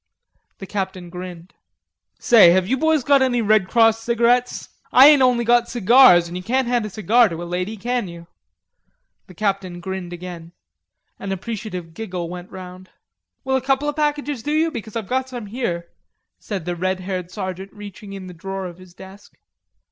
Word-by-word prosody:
The 195 - -8
Captain 190 -3 -5
grinned. 180 0 -9 0.6
"Say, 220 -7 +6
have 185 0 +1
you 265 - +1
boys 315 0 +1
got 280 +1 +4
any 250 -2 +2
Red 215 -3 +3
Cross 225 +1 +3
cigarettes? 235 +2 +1 0.2
I 260 - +8
ain't 295 -3 +5
only 245 -2 +3
got 240 0 +3
cigars, 235 -6 +6
an' 170 - -8
you 180 - -4
can't 250 +6 0
hand 240 -3 0
a - - -8
cigar 220 +3 +3
to 170 0 -6
a - - -6
lady, 180 +5 -4
can 240 0 -2
you?" 170 -1 -10 1.0
The 185 - -15
Captain 195 -2 -2
grinned 190 -1 -6
again. 175 -1 -9 0.7
An 195 - -5
appreciative 195 -4 -6
giggle 180 -4 -5
went 180 +1 -8
round. 185 0 -11 0.5
"Will 265 0 0
a 265 - +1
couple 270 +2 0
of 295 - -2
packages 295 -3 -1
do 295 +5 -3
you? 320 +1 +1
Because 220 -6 -8
I've 225 -4 -4
got 260 +1 -1
some 245 -4 -7
here," 200 -7 -4 0.5
said 195 -6 -5
the 175 -1 -3
red 185 +2 -2
haired 185 -2 -4
sergeant 190 0 -6
reaching 205 -1 -11
in 195 -1 -8
the 180 - -9
drawer 195 +3 -6
of 175 0 -9
his 185 -1 -16
desk. 190 +2 -14
200 Hz, 185 wpm, -21 LUFS, 180-240 Hz, 1.0 s, I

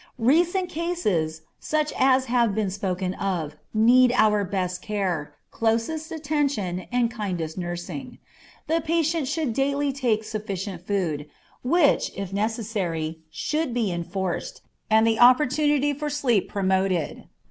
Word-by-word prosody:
Recent 345 +10 +2
cases, 210 - -1 0.2
such 305 -1 -1
as 260 0 +4
have 235 -4 +2
been 210 -3 0
spoken 185 -1 -2
of, 175 -7 -3 0.2
need 240 +3 +5
our 210 -3 +4
best 185 -2 -2
care, 185 -8 -2 0.2
closest 230 +9 -1
attention, 285 - -1
and 240 -1 +1
kindest 180 -8 -3
nursing. 175 +9 -5 0.5
The 330 +1 +1
patient 320 -2 0
should 300 -4 -1
daily 280 +2 0
take 240 -5 0
sufficient 195 -4 -5
food, 160 -7 -1 0.3
which, 295 +3 +3
if 195 -1 -5
necessary, 200 -7 -2
should 300 - -2
be 225 -6 +1
enforced, 175 +2 -4 0.3
and 220 +1 +5
the 225 -1 +2
opportunity 290 +3 +4
for 295 +2 -3
sleep 260 -9 +1
promoted. 190 -4 0
220 Hz, 125 wpm, -25 LUFS, 185-280 Hz, 0.5 s, need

